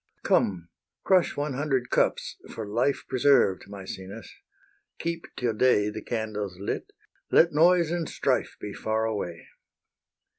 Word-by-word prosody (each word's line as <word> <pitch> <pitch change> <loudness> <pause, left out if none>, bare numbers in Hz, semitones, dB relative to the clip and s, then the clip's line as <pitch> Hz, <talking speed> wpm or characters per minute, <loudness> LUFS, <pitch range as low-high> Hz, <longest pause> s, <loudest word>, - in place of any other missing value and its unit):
Come, 85 -4 +1 0.3
crush 185 -3 +3
one 145 0 -1
hundred 135 -2 -1
cups - - +1
for 110 - -6
life 120 +7 0
Preserved, 130 -7 +3
Maecenas; 100 +1 -8 0.7
keep 170 0 -3
till 120 -3 0
day 105 -2 +3
The 110 - -6
candles 105 -5 -4
lit; 100 - -4 0.4
let 170 +1 +5
noise 170 +1 +4
and 170 -2 -2
strife - - 0
Be 105 - -6
far 110 0 -1
away. 95 -6 -4
115 Hz, 125 wpm, -27 LUFS, 105-145 Hz, 0.7 s, let